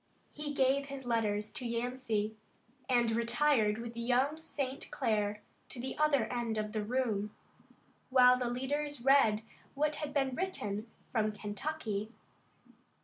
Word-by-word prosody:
He 295 -1 -5
gave 270 +1 +3
his 275 -2 -7
letters 215 -3 0
to 250 - -4
Yancey 235 -3 -1 0.5
and 240 -2 +3
retired 235 -1 +2
with 235 0 -6
young 250 +5 +2
St. 275 -4 -1
Clair 210 -4 0 0.3
to 250 - -8
the 260 +2 -4
other 300 -3 +4
end 235 -2 -1
of 210 0 -2
the 215 -1 -2
room, 215 -3 -1 0.7
while 250 -1 +7
the 250 -1 -1
leaders 275 +2 -2
read 225 -6 +5 0.3
what 300 +1 +1
had 300 -2 -4
been 270 -2 +1
written 230 - -3 0.2
from 215 -3 +1
Kentucky. 215 0 -4
245 Hz, 135 wpm, -33 LUFS, 215-275 Hz, 0.7 s, while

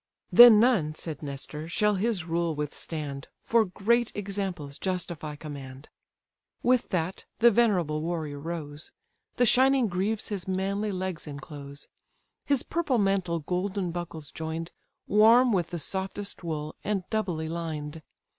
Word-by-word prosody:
"Then 235 -3 +10
none 210 -11 +3
(said 155 -2 -6
Nestor) 150 +2 -6
shall 210 +4 +2
his 200 -3 0
rule 170 -1 -1
withstand, 145 -1 -5
For 230 -1 +2
great 225 +5 +1
examples 190 -8 -4
justify 170 -5 -3
command." 140 -2 -9 0.7
With 250 0 +2
that, 180 -1 -2
the 235 +1 +6
venerable 185 -10 +2
warrior 160 -3 -3
rose; 155 -1 -6 0.4
The 245 - +3
shining 260 +2 +4
greaves 200 +4 -2
his 195 -4 -3
manly 195 +3 -1
legs 185 -3 -4
enclose; 140 0 -9 0.6
His 280 -3 +2
purple 305 -6 0
mantle 190 -5 +1
golden 185 +3 -2
buckles 165 -4 -6
join'd, 160 +1 -5 0.3
Warm 225 +4 +6
with 175 -4 +1
the 175 - -5
softest 190 +4 -3
wool, 155 -2 -4
and 205 -3 -1
doubly 180 -8 -1
lined. 160 -2 -5
175 Hz, 130 wpm, -27 LUFS, 155-210 Hz, 0.7 s, Then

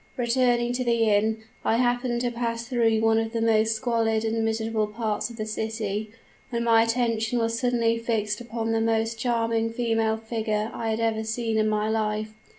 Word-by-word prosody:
"Returning 240 0 +2
to 255 +1 -1
the 230 -2 +2
inn, 220 +2 +1 0.2
I 225 - +2
happened 245 0 +1
to 245 -1 0
pass 235 -1 -3
through 230 -3 +2
one 225 0 +3
of 225 0 -3
the 230 - -1
most 225 0 +3
squalid 225 -2 0
and 225 0 0
miserable 220 -1 0
parts 215 0 -2
of 235 - -10
the 215 - -3
city, 215 -1 -3 0.4
when 235 -1 -2
my 230 -1 +5
attention 230 0 0
was 230 0 0
suddenly 235 -2 +1
fixed 215 -2 -1
upon 230 -1 -3
the 225 0 +1
most 225 0 0
charming 230 -1 0
female 225 -1 0
figure 220 -1 -2
I 225 - -3
had 220 0 -1
ever 225 -1 0
seen 225 0 -2
in 215 0 +2
my 215 0 0
life. 215 0 -1
225 Hz, 185 wpm, -25 LUFS, 220-235 Hz, 0.4 s, my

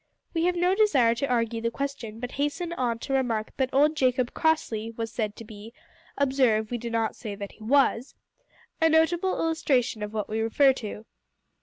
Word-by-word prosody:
We 330 0 +1
have 360 0 +2
no 355 +1 +2
desire 290 - +4
to 245 +4 -2
argue 230 -2 0
the 230 - 0
question, 235 -4 -5
but 245 +1 -5
hasten 295 +5 -2
on 245 -7 -1
to 270 - -5
remark 235 -5 -1
that 265 -2 +1
old 295 +3 +3
Jacob 255 -3 +1
Crossley 230 -9 0
was 225 -1 -5
said 215 -3 -3
to - - -9
be 215 +2 -12 0.4
observe, 255 -6 +2
we 240 - -2
do 235 +1 -5
not 225 -1 -1
say 215 -4 -6
that 200 -1 -7
he 220 - -15
was 260 0 +2 0.7
a 325 - +5
notable 335 +4 +2
illustration 275 -9 0
of 210 0 -4
what 215 -1 -3
we 220 +1 -3
refer 265 +5 +4
to. 215 -3 -7
245 Hz, 190 wpm, -26 LUFS, 225-285 Hz, 0.7 s, a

